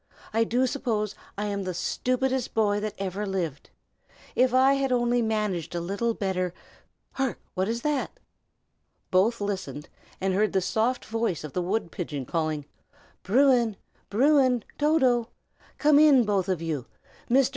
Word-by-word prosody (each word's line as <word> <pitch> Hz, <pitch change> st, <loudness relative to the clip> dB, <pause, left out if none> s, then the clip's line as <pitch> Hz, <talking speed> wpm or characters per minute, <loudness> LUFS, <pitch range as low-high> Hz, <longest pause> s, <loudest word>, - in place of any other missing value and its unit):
I 225 Hz, +1 st, +3 dB
do 245 Hz, +3 st, +1 dB
suppose 230 Hz, -6 st, -1 dB, 0.2 s
I 205 Hz, -, -2 dB
am 200 Hz, -1 st, -2 dB
the 185 Hz, -2 st, -4 dB
stupidest 255 Hz, +5 st, -1 dB
boy 205 Hz, -2 st, +2 dB
that 210 Hz, 0 st, -4 dB
ever 195 Hz, +1 st, -3 dB
lived. 180 Hz, -8 st, -3 dB, 0.7 s
If 255 Hz, 0 st, +4 dB
I 260 Hz, +2 st, +5 dB
had 275 Hz, -1 st, 0 dB
only 240 Hz, 0 st, +2 dB
managed 210 Hz, -7 st, -1 dB
a -, -, 0 dB
little 200 Hz, +7 st, -1 dB
better 185 Hz, -2 st, -2 dB, 0.6 s
hark! 265 Hz, -2 st, -2 dB, 0.2 s
what 185 Hz, +3 st, -1 dB
is 235 Hz, +1 st, -2 dB
that?" 300 Hz, -, -1 dB, 0.9 s
Both 210 Hz, +6 st, +3 dB
listened, 190 Hz, -9 st, -4 dB, 0.3 s
and 190 Hz, 0 st, 0 dB
heard 210 Hz, +3 st, +1 dB
the 190 Hz, -, +3 dB
soft 220 Hz, +8 st, 0 dB
voice 225 Hz, -8 st, -2 dB
of 150 Hz, -, -7 dB
the 180 Hz, -, 0 dB
wood 185 Hz, -1 st, -1 dB
pigeon 145 Hz, -7 st, -4 dB
calling, 155 Hz, -1 st, -2 dB, 0.6 s
"Bruin! 240 Hz, 0 st, +3 dB, 0.3 s
Bruin! 255 Hz, 0 st, +3 dB, 0.2 s
Toto! 260 Hz, -6 st, +3 dB, 0.5 s
come 295 Hz, -1 st, +5 dB
in, 290 Hz, -5 st, +7 dB
both 200 Hz, -3 st, 0 dB
of 175 Hz, -3 st, -1 dB
you. 150 Hz, -7 st, -3 dB, 0.4 s
Mr. 265 Hz, +2 st, +4 dB
215 Hz, 150 wpm, -26 LUFS, 185-250 Hz, 0.9 s, in